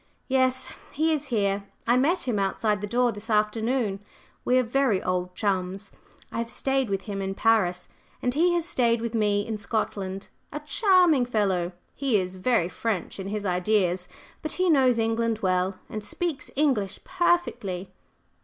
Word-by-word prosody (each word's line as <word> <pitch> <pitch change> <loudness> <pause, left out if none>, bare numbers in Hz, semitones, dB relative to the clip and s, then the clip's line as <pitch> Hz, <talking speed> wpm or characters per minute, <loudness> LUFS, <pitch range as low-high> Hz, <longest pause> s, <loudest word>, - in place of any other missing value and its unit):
"Yes, 260 -1 +1 0.2
he 315 +2 +2
is 300 -1 -1
here. 200 -5 0 0.2
I 240 - +4
met 310 +9 +2
him 220 -5 +1
outside 205 +1 0
the 205 - -3
door 245 +2 +2
this 210 +2 -7
afternoon. 215 0 +1 0.4
We 250 - +3
are 255 - +4
very 245 -4 +2
old 180 0 -2
chums. 195 0 -2 0.4
I - - -3
have 230 0 -2
stayed 270 -1 0
with 195 -1 -1
him 195 0 -4
in 195 0 -3
Paris, 190 -6 +2 0.3
and 245 - 0
he 345 +5 +3
has 340 -2 0
stayed 235 -7 +2
with 230 0 -4
me 205 -2 +1
in 225 -2 -3
Scotland. 200 -2 -3 0.2
A 295 - -4
charming 330 - +4
fellow! 190 -6 0 0.2
He 270 -6 +1
is 185 -1 -3
very 185 -3 +2
French 200 0 -3
in 190 - -5
his 205 0 -3
ideas; 180 -1 +1 0.3
but 310 - -3
he 365 -1 +2
knows 260 -5 +4
England 225 0 0
well, 185 0 +1
and 215 -1 -6
speaks 340 - -3
English 240 -10 0
perfectly." 210 - 0
220 Hz, 165 wpm, -26 LUFS, 195-260 Hz, 0.4 s, I